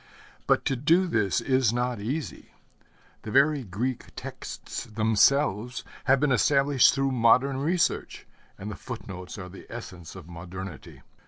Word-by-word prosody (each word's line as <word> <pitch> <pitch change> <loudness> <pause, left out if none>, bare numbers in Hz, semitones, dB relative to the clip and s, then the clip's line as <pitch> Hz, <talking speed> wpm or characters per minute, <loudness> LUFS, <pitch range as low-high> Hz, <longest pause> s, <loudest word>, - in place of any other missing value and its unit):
But - - +2
to 135 - +1
do 165 +8 +3
this 110 - +1
is 130 -4 +2
not 120 -1 -1
easy. 135 +9 -4 0.7
The - - -8
very 140 +3 +3
Greek 115 +6 -3
texts - - -7
themselves 110 +2 +2 0.2
have 135 0 +4
been 145 -1 +2
established 140 0 +4
through 135 0 +1
modern 130 +3 +3
research, 165 +6 -1 0.3
and 105 +2 -6
the - - -6
footnotes 95 -5 -8
are 90 -2 -7
the 95 +2 -12
essence 90 -8 -9
of 90 -4 -10
modernity. 90 -1 -9
120 Hz, 140 wpm, -27 LUFS, 100-135 Hz, 0.7 s, have